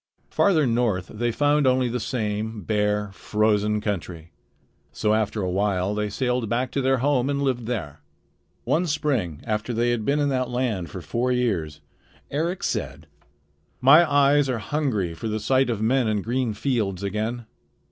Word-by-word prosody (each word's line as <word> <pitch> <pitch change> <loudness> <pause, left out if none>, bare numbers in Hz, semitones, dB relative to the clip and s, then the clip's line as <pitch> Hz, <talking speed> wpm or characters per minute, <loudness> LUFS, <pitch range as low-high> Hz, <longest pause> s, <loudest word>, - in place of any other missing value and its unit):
Farther 165 -7 +3
north 115 -7 0
they 120 +2 -1
found 145 +3 +2
only 130 0 +3
the 120 +1 -2
same 110 -2 -3
bare, 105 0 0
frozen 105 +1 +1
country. 85 -5 -4 0.6
So 105 0 0
after 110 -1 0
a 90 - -1
while 100 0 0
they 105 0 -1
sailed 125 +1 -1
back 125 +3 -1
to 140 - -1
their 135 0 +2
home 135 0 +1
and 140 0 0
lived 125 -4 -1
there. 80 -12 -4 0.6
One 175 +3 +1
spring 130 - -1
after 110 +2 -2
they 120 +1 +1
had 120 -2 -1
been 140 +6 +1
in 145 -1 +1
that 130 -2 -1
land 120 -8 -2
for 95 - -7
four 120 +10 -1
years, 90 -13 -1 0.5
Eric 170 +6 -2
said: 75 +4 -3 0.7
"My 150 +5 +6
eyes 145 0 +4
are 125 - 0
hungry 110 - -1
for 95 +7 -6
the 110 0 -2
sight 130 +4 +2
of 110 -2 -1
men 125 +1 +2
and 105 -2 0
green 120 -2 -1
fields 105 -6 -1
again. 110 +4 -3
115 Hz, 165 wpm, -24 LUFS, 105-130 Hz, 0.7 s, My